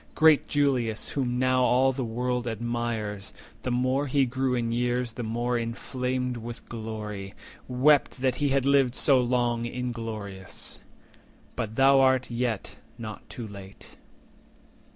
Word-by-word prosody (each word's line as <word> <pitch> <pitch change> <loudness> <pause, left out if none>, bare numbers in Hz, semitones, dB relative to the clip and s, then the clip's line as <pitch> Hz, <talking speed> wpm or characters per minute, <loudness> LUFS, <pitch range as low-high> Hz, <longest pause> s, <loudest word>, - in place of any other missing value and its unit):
Great 155 -2 +5
Julius, 130 -6 +1
whom 125 -3 -1
now 130 0 +3
all 130 +1 +4
the 130 0 -3
world 125 +1 -2
admires, 115 -3 -3 0.3
The - - -3
more 130 +3 +1
he 135 0 +3
grew 130 +1 0
in 115 -1 -1
years, 120 0 0
the 120 - -5
more 120 +2 -1
inflamed 125 +2 -2
40 - - -6
With 120 0 -7
glory, 105 -3 -6 0.3
wept 140 +4 +3
that 130 0 +2
he 145 -1 +1
had 135 -1 +2
lived 135 -3 +4
so 135 -2 +4
long 120 -1 +1
Ingloroious. 115 -6 -5 0.8
But 110 -1 -3
thou 135 0 +6
yet 120 -3 -2
art - - -28
not 110 -2 -8
too 120 -3 -6
late." 100 -1 -12
125 Hz, 140 wpm, -27 LUFS, 115-130 Hz, 0.8 s, thou